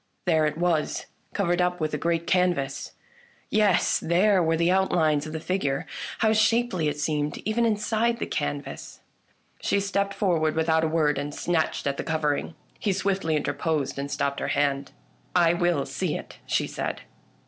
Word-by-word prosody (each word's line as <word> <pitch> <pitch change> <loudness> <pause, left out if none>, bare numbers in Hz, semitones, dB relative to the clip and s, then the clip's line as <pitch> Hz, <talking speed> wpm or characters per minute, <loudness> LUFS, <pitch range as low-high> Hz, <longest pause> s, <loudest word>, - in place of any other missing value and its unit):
There 160 -3 +3
it 150 0 -3
was, 170 -3 0 0.3
covered 175 -2 +1
up 180 0 0
with 155 -1 -1
a - - +1
great 170 +1 0
canvas! 175 -7 0 0.6
Yes, 205 -4 +3
there 185 +3 +3
were 165 -1 +2
the 170 +2 +3
outlines 160 -6 +2
of - - -6
the 160 - -4
figure. 155 -6 -1 0.4
How 220 - +4
shapely 215 -6 +2
it 150 0 -1
seemed, 150 -1 -1
even 230 +2 +2
inside 225 +2 +1
the - - -3
canvas! 70 0 -4 0.6
She 200 - +1
stepped 200 0 -1
forward 165 -6 +1
without 160 0 +2
a - - +2
word, 155 -3 +1
and 145 +1 -4
snatched 165 -2 -1
at 140 -1 -1
the - - -3
covering. 155 0 -1 0.2
He 200 - +1
swiftly 190 -4 0
interposed 150 -2 -1
and 140 +1 -3
stopped 140 -1 -1
her - - -2
hand, 140 -1 0 0.2
" - - -36
I 170 -2 +5
will 175 -4 +1
see - - -2
it," - - -11
she - - +1
said. - - -4
165 Hz, 170 wpm, -26 LUFS, 150-190 Hz, 0.6 s, I